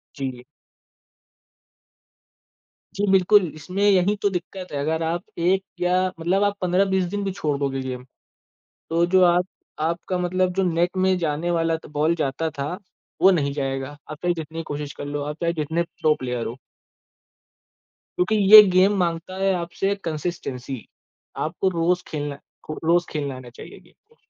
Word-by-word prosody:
जी। 130 -3 -5 2.5
जी, 205 +1 0
बिल्कुल। 195 +1 +5
इसमें 180 +6 -3
यही 200 0 +4
तो 205 - +3
दिक्कत 185 0 -6
है 145 - -3
अगर 160 +3 -1
आप 170 +2 -2
एक 185 +3 +2 0.2
या 180 +1 +2
मतलब 185 +5 +1
आप 205 0 +1
15-20 190 +1 +2
दिन 205 0 -1
भी 195 - -1
छोड़ 150 -6 -2
दोगे 135 -1 -1
गेम 125 -1 -5 0.9
तो 165 +1 +3
जो 185 +1 +4
आप 175 +1 +3 0.3
आपका 170 +3 -1
मतलब 180 +1 0
जो 195 - +1
नेट 175 +3 0
में 185 0 +3
जाने 165 0 -1
वाला 165 -1 +1
त - - -14
बॉल 155 +3 +3
जाता 160 0 -2
था 140 -2 -4 0.5
वो 190 - +8
नहीं 145 -6 +1
जाएगा। 135 0 -3
आप 155 - -5
चाहें 175 0 +1
जितनी 165 0 -6
कोशिश 145 -2 -5
कर - - -7
लो, 145 0 -3
आप 150 +1 -4
चाहें 170 0 0
जितने 160 +2 -1
प्रो 155 -2 0
प्लेयर 125 -2 -3
हो। 120 +3 -6 1.6
क्योंकि 180 +5 +2 0.2
ये 215 - +15
गेम 190 +3 +5
माँगता 170 0 -2
है 195 0 +2
आपसे 180 +3 -1
कंसिस्टेंसी, 150 -5 -4 0.6
आपको 175 +4 -1
रोज़ 175 +1 0
खेलना 145 -2 -4 0.3
खो 155 - -5
रोज 170 +2 +3
खेलना 145 -3 -3
आना 125 -1 -11
चाहिए 120 - -12
गेम - - -23 0.2
को। 460 - -26
170 Hz, 165 wpm, -23 LUFS, 145-185 Hz, 2.5 s, ये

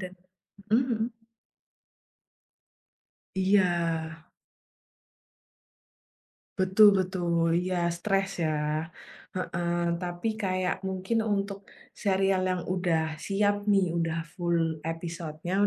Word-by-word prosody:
dan 185 -1 -6 0.6
mhm 240 +4 +4
mhm. 225 0 -2 2.2
Iya. 180 -4 +3 2.6
Betul 190 +3 +7
betul, 175 -3 +1
iya 180 -1 0
stres 195 +1 -1
ya, 155 0 -1 0.5
heeh. 175 -1 -1
Tapi 180 +5 -2
kayak 185 -3 -1
mungkin 190 +4 -1
untuk 200 -2 -2 0.2
serial 195 -1 +1
yang 180 -1 0
udah 170 -4 0
siap 205 +1 +1
nih, 195 -4 +3
udah 165 -1 -1
full 165 -3 0
episodenya, 165 0 -5
185 Hz, 85 wpm, -28 LUFS, 170-195 Hz, 2.6 s, Betul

